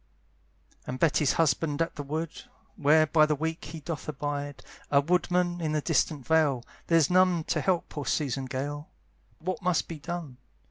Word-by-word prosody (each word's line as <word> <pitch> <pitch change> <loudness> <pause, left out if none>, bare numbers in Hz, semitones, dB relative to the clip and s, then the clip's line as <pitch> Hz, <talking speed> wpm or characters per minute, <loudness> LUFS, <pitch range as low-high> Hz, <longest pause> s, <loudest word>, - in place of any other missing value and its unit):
And 130 - -3
Betty's 150 -3 +3
husband's 160 -1 +1
at 165 - -6
the - - -4
wood, 155 +3 -3 0.4
Where 155 +2 +5
by 155 0 +4
the 150 - +1
week 160 +3 -3
he 160 0 -8
doth 155 0 -5
abide, 145 0 -4 0.3
A 140 - +5
woodman 175 +2 +1
in 155 -2 -1
the 155 - +1
distant 150 -3 0
vale; 145 -4 +2 0.2
There's 165 -2 +4
none 180 -2 +4
to - - -1
help 185 -3 +1
poor 145 -3 -6
Susan 135 -3 0
Gale, 145 +3 -4 0.5
What 185 +6 -4
must 180 -3 +1
be 165 -2 -7
done? 165 -5 -6
155 Hz, 170 wpm, -28 LUFS, 145-165 Hz, 0.5 s, Where